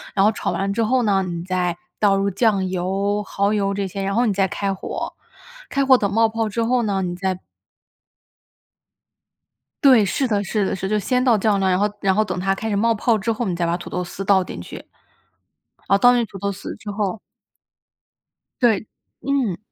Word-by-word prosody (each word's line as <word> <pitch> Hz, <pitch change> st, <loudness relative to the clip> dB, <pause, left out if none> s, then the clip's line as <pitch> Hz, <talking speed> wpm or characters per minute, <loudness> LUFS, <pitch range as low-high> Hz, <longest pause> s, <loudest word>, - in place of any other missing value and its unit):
然 195 Hz, -, +4 dB
后 215 Hz, -, +5 dB
炒 -, -, -3 dB
完 195 Hz, 0 st, -1 dB
之 230 Hz, +2 st, 0 dB
后 250 Hz, +2 st, +2 dB
呢， 195 Hz, -2 st, +2 dB
你 170 Hz, -2 st, -4 dB
再 180 Hz, -1 st, -1 dB, 0.2 s
倒 200 Hz, -2 st, +4 dB
入 195 Hz, 0 st, +1 dB
酱 200 Hz, -2 st, +1 dB
油， 195 Hz, +3 st, -1 dB
耗 200 Hz, +1 st, 0 dB
油 200 Hz, -1 st, 0 dB
这 200 Hz, -1 st, -2 dB
些、 195 Hz, +2 st, -5 dB
然 195 Hz, +1 st, -1 dB
后 240 Hz, -, +3 dB
你 215 Hz, -, +1 dB
再 195 Hz, 0 st, +2 dB
开 195 Hz, +1 st, -2 dB
火， 190 Hz, -, -5 dB, 0.6 s
开 275 Hz, -1 st, +1 dB
火 265 Hz, -1 st, +7 dB
等 200 Hz, -4 st, -1 dB
冒 225 Hz, +2 st, +4 dB
泡 225 Hz, -1 st, -2 dB
之 230 Hz, +3 st, -1 dB
后 245 Hz, +1 st, +2 dB
呢， 200 Hz, -3 st, 0 dB
你 175 Hz, 0 st, -3 dB
再 185 Hz, 0 st, -2 dB, 2.5 s
对， 255 Hz, -6 st, +7 dB
是 250 Hz, +8 st, 0 dB
的， 205 Hz, -2 st, 0 dB
是 205 Hz, 0 st, -1 dB
的。 -, -, -1 dB
是， 190 Hz, 0 st, -4 dB
就 215 Hz, -, +1 dB
先 250 Hz, +5 st, 0 dB
倒 240 Hz, -4 st, +4 dB
酱 205 Hz, -1 st, +1 dB
呢， 190 Hz, -, +1 dB
然 180 Hz, -, +2 dB
后 205 Hz, +1 st, +2 dB
然 195 Hz, -1 st, +2 dB
后 215 Hz, +3 st, +2 dB
等 185 Hz, -3 st, -4 dB
它 195 Hz, +1 st, +1 dB
开 220 Hz, +3 st, -4 dB
始 205 Hz, -, 0 dB
冒 230 Hz, +3 st, +2 dB
泡 225 Hz, +1 st, +2 dB
之 215 Hz, +3 st, -1 dB
后， 230 Hz, +2 st, -2 dB
你 180 Hz, -, -1 dB
再 170 Hz, 0 st, -1 dB
把 170 Hz, +1 st, 0 dB
土 -, -, -9 dB
豆 180 Hz, -, -2 dB
丝 190 Hz, +2 st, -7 dB
倒 190 Hz, -1 st, +4 dB
进 85 Hz, -, -8 dB
去。 90 Hz, -, -9 dB, 1.1 s
哦 195 Hz, -, +5 dB
倒 245 Hz, +5 st, +6 dB
进 240 Hz, -1 st, +2 dB
土 195 Hz, -, -11 dB
豆 200 Hz, +1 st, -2 dB
丝 200 Hz, -, -7 dB
之 210 Hz, -, -7 dB
后 205 Hz, 0 st, -2 dB, 1.4 s
对， 220 Hz, -4 st, +2 dB, 0.3 s
嗯。 255 Hz, -8 st, 0 dB
200 Hz, 230 characters per minute, -21 LUFS, 190-225 Hz, 2.5 s, 火